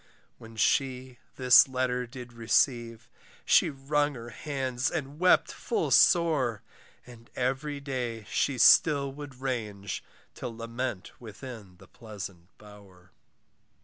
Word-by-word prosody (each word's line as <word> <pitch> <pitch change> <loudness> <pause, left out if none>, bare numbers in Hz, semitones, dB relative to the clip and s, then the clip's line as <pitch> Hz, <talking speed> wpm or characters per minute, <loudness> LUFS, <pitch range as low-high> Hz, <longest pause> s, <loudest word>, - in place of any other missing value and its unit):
When 115 0 -13
she 130 +1 0 0.2
this 125 0 +7
letter 125 -1 -2
did 125 -1 -10
receive, 115 0 0 0.4
She - - +4
wrung 145 +1 -1
her 120 0 -9
hands 130 -1 -3
and 145 -2 -5
wept 180 0 +4
full 440 -3 -2
sore: 150 - +3 0.4
And 120 -1 -15
every 135 +3 -2
day 125 -5 -4
she 135 +2 -1
still 140 +3 +5
would 140 -2 -10
range, 105 -7 -4 0.4
To - - -3
lament 115 -2 -5
within 110 -4 -10
the - - -17
pleasant 100 -6 -10
bower. 100 -4 -17
125 Hz, 115 wpm, -28 LUFS, 115-135 Hz, 0.4 s, this